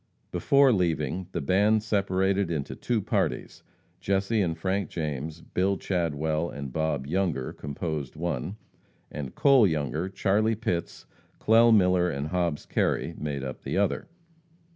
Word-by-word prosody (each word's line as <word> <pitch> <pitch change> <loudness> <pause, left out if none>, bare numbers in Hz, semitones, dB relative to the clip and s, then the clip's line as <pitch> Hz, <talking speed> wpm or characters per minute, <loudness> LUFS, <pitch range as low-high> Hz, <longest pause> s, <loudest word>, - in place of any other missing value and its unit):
Before 140 -2 +4
leaving, 85 -1 -1
the - - -3
band 105 +8 +3
separated 100 -2 +1
into 75 -4 -3
two 115 -4 -1
parties, - - -2 0.4
Jesse 100 +3 +1
and 85 -4 -1
Frank 95 +3 -1
James, 80 0 -4
Bill 95 +3 0
Chadwell 80 -2 -1
and 70 -3 -7
Bob 80 -4 -1
Younger, 80 -5 -1
composed 75 -1 -5
one, 85 +2 -3 0.6
and 70 -3 -6
Cole 135 -6 +5
Younger, 80 +2 -2
Charlie 105 +4 +1
Pitts, 100 -6 -3 0.3
Clell 115 +2 +5
Miller 90 -4 +4
and 70 -1 -3
Hobbs 85 -4 -1
Kerry, - - 0
made 70 -3 -3
up 65 -1 -6
the - - -3
other. - - 0
90 Hz, 135 wpm, -27 LUFS, 75-100 Hz, 0.6 s, Cole